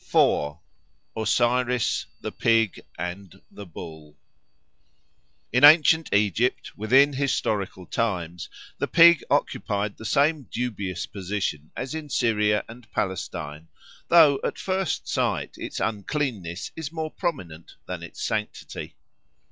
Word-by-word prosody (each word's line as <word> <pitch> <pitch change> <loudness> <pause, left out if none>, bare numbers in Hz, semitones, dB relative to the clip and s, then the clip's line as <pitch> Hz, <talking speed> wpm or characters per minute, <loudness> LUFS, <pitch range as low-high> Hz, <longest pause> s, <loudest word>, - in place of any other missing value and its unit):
4. 75 +1 +2 0.6
Osiris, 120 +2 +1
the - - -4
Pig 115 -3 +1 0.2
and 90 +3 -6
the 100 -2 -10
Bull 80 -3 -10 1.4
IN 125 +3 +3
ANCIENT 160 +1 +7
Egypt, 105 +4 +1
within 135 +7 +4
historical 105 -9 -1
times, 90 -7 -2 0.3
the - - 0
pig 170 -1 +7
occupied 100 0 -1
the - - -10
same 145 +4 +1
dubious 100 -7 -3
position 95 -6 -4
as 130 +3 -4
in 155 -2 -6
Syria 105 -5 +1
and 115 -1 -13
Palestine, 80 -5 -4 0.4
though 155 -5 +6
at - - -2
first 190 -1 -2
sight 115 - -1
its - - -5
uncleanness 105 - -3
is 160 -2 -5
more 160 -1 -4
prominent 90 - -5
than - - -5
its - - -8
sanctity. 105 -1 -4
110 Hz, 115 wpm, -25 LUFS, 95-140 Hz, 1.4 s, ANCIENT